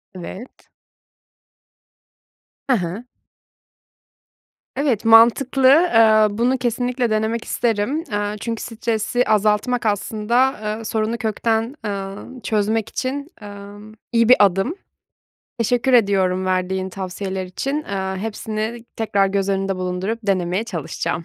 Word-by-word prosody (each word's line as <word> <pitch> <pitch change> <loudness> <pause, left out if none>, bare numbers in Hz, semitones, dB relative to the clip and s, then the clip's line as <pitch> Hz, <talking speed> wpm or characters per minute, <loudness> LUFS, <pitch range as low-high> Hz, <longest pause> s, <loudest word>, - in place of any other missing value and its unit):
Evet. 185 +7 -10 2.0
He 260 - +5
he. 195 +4 -4 1.7
Evet, 270 -7 0
mantıklı, 240 +4 +5
eee, 225 -9 +5
bunu 250 +3 +2
kesinlikle 245 0 -1
denemek 220 +1 -1
isterim, 235 +7 -1
eee, 205 0 -1
çünkü 230 +1 -4
stresi 230 +1 -1
azaltmak, 215 +3 +1
aslında, 220 +5 +1 0.2
eee, - - -8
sorunu 220 +1 -1
kökten, 225 +2 -1
emm, 200 +5 -6
çözmek 220 0 0
için, 280 +5 -4
emm, 205 +1 -11 0.2
iyi 230 -1 +3
bir 255 - +9
adım. 200 - +3 0.8
Teşekkür 245 +3 +1
ediyorum 190 -5 +3
verdiğin 185 0 -1
tavsiyeler 190 0 -5
için, 270 +10 -3
eee, 190 -5 -3
hepsini 220 +1 -4
tekrar 200 -3 +1
göz 195 0 -1
önünde 195 -1 -1
bulundurup 185 +4 -3
denemeye 190 0 0
çalışacağım. 170 - -4
215 Hz, 105 wpm, -21 LUFS, 195-240 Hz, 2.0 s, bir